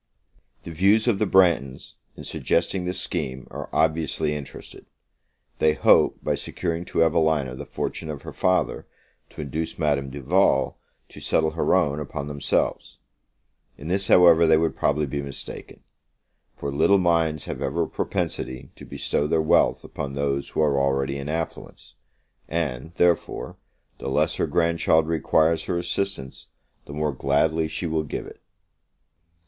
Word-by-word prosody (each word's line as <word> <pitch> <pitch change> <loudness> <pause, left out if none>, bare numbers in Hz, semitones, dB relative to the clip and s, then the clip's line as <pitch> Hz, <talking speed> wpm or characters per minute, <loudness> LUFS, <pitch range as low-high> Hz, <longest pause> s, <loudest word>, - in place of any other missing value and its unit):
The 85 - -8
views 100 +7 +3
of 110 -5 +2
the 110 - +1
Branghtons, 85 -9 +2 0.2
in - - -8
suggesting 95 -2 -1
this 90 +1 -2
scheme, 65 0 -3
are - - -7
obviously 80 -1 0
interested. 75 -2 -9 0.7
They 80 -1 +4
hope, - - +4
by - - 0
securing 85 -1 -3
to 80 - +2
Evelina 80 -5 +1
the 65 - -8
fortune 80 - -4
of 75 -2 -6
her - - -8
father, 90 0 0 0.4
to - - -8
induce 80 +3 -4
Madame 70 -4 0
Duval 70 +8 +1 0.3
to - - -12
settle 80 -1 +1
her 80 +3 +1
own 75 -6 +1
upon 70 -1 -5
themselves. 70 -1 -1 0.8
In 75 - -8
this, 95 +1 0
however, 85 -2 +6
they 80 0 +5
would 80 0 0
probably 75 +1 +1
be 70 +1 -3
mistaken; 70 -1 -7 0.7
for 70 - -4
little 80 +8 +4
minds 85 -4 +1
have 65 - -6
ever 70 +5 0
a - - -3
propensity 65 -1 -4
to - - -11
bestow 75 - -1
their 80 +1 +1
wealth 80 - +3
upon 70 -1 -6
those 70 0 -1
who - - -1
are 70 -3 +2
already 70 0 0
in 70 +1 -5
affluence; 80 +1 -5 0.5
and, 80 -3 -3
therefore, 85 -2 0 0.4
the - - -4
less - - +1
her - - 0
grandchild 85 -2 +2
requires 80 0 +2
her 90 - -1
assistance, 85 -5 -3 0.4
the 70 - -9
more 75 0 -1
gladly 80 +5 +1
she 80 +3 -4
will 80 -1 0
give 75 - -5
it. - - -13
80 Hz, 155 wpm, -24 LUFS, 70-85 Hz, 0.8 s, however